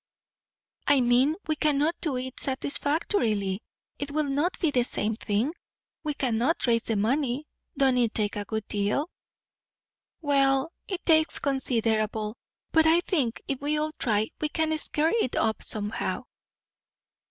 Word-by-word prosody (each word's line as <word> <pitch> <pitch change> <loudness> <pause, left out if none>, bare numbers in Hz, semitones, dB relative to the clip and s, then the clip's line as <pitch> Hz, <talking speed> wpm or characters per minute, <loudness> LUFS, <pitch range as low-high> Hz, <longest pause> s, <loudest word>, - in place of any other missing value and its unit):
"I 285 -1 +5
mean, 250 +5 +4
we 310 - 0
cannot 300 +1 +2
do 295 -6 -1
it 255 0 -5
satisfactorily. 260 - 0 0.4
It 285 - -3
will 300 0 0
not 295 +7 0
be 325 -4 +2
the 250 - +3
same 220 -2 0
thing. 220 +7 -1 0.5
We 300 -2 -2
cannot 250 +5 +1
raise 230 -2 +3
the 225 - -2
money. 255 +6 0 0.3
Don't 265 -2 +3
it 235 -2 +1
take 210 -2 0
a 205 - -2
good 220 0 -4
deal?" 210 - -1 1.1
"Well, 275 0 +2 0.2
it 375 -3 -5
takes 315 -1 +4
considerable. 225 -5 0 0.4
But 320 -1 +5
I 330 +2 +5
think, 280 -11 -1
if 275 -1 -2
we 295 +1 0
all 305 +1 -1
try, 220 -7 0
we 305 - 0
can 315 0 0
scare 310 +2 +1
it 255 - -1
up 220 0 +1
somehow." 210 0 -1
270 Hz, 145 wpm, -27 LUFS, 225-305 Hz, 1.1 s, I